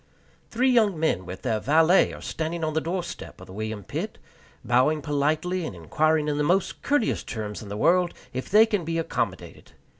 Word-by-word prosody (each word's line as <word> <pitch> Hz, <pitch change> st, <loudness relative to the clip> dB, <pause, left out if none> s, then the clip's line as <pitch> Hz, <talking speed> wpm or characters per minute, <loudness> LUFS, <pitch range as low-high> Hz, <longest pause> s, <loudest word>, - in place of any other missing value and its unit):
Three 255 Hz, +3 st, +2 dB
young 215 Hz, -8 st, +3 dB
men, 95 Hz, -, 0 dB
with 95 Hz, +1 st, -8 dB
their 115 Hz, -4 st, 0 dB
valet, 160 Hz, -, +4 dB
are -, -, -10 dB
standing 165 Hz, +1 st, -3 dB
on 155 Hz, -1 st, -1 dB
the 160 Hz, -, +1 dB
doorstep 175 Hz, +1 st, -5 dB
of -, -, -11 dB
the 95 Hz, -, -12 dB
William 110 Hz, 0 st, -4 dB
Pitt, -, -, -5 dB, 0.5 s
bowing 130 Hz, +6 st, +2 dB
politely, 155 Hz, +6 st, 0 dB
and 130 Hz, -, -5 dB
inquiring 150 Hz, -, +1 dB
in 145 Hz, 0 st, -1 dB
the -, -, +2 dB
most 180 Hz, +6 st, +1 dB
courteous 285 Hz, -5 st, +1 dB
terms 105 Hz, -2 st, -5 dB
in 105 Hz, -, -9 dB
the 100 Hz, -, -5 dB
world 175 Hz, +6 st, +3 dB, 0.2 s
if 130 Hz, +1 st, -4 dB
they 215 Hz, +3 st, +7 dB
can 205 Hz, -5 st, -1 dB
be 165 Hz, +1 st, -2 dB
accommodated. 165 Hz, -, -4 dB
155 Hz, 190 wpm, -25 LUFS, 125-180 Hz, 0.5 s, they